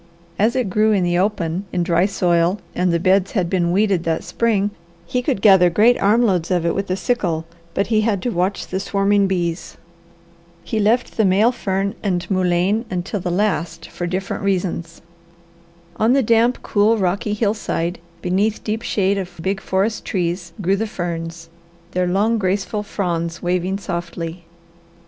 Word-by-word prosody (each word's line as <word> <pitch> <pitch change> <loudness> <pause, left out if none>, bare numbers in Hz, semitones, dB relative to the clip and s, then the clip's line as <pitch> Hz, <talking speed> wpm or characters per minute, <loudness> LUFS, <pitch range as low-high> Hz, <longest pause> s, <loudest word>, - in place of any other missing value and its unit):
As 220 +4 +3
it 255 -4 +1
grew 215 +3 +3
in 195 -3 +2
the 175 0 +1
open 190 -2 -1
in 175 - 0
dry 170 +1 +2
soil 175 -1 +1
and 180 0 +1
the 170 - +1
beds 190 +2 +2
had 185 -6 0
been 175 -3 +1
weeded 195 -2 +2
that 165 -1 -1
spring, 210 -3 0 0.3
he 250 - -1
could 250 -6 -2
gather 190 -4 +7
great 220 +7 +4
arm 215 +4 +4
loads 180 -7 +1
of 175 -3 +1
it 170 - +1
with 195 0 -3
a 185 - +1
sickle, 180 -8 -1 0.3
but 200 - +1
he 215 - +4
had 215 -3 +1
to 245 - 0
watch 185 +2 -1
the 190 - -3
swarming 200 0 +2
bees. 175 -2 -2 0.9
He 220 - -2
left 225 +4 +1
the 220 - +4
male 205 +5 +4
fern 195 -4 -2
and 180 -3 -1
mullein 185 +3 +1
until 185 +3 -3
the 180 - -3
last 175 -3 -1
for 175 - -4
different 185 +4 -3
reasons. 180 -4 -2 0.9
On 225 +3 +3
the 270 -1 +3
damp, 230 +2 +2
cool, 215 +2 +3
rocky 200 +3 0
hillside, 200 -5 -1 0.2
beneath 200 +4 0
deep 220 +1 -2
shade 200 -3 0
of 180 -2 -7
big 195 +3 -2
forest 200 +4 -1
trees, 175 -1 -2
grew 195 +2 +2
the 220 +2 -1
ferns, 165 -3 -5 0.4
their 180 0 0
long, 210 +5 +1
graceful 200 +2 -1
fronds 170 -5 -3
waving 180 +2 0
softly. 170 -2 -5
190 Hz, 170 wpm, -20 LUFS, 175-210 Hz, 0.9 s, gather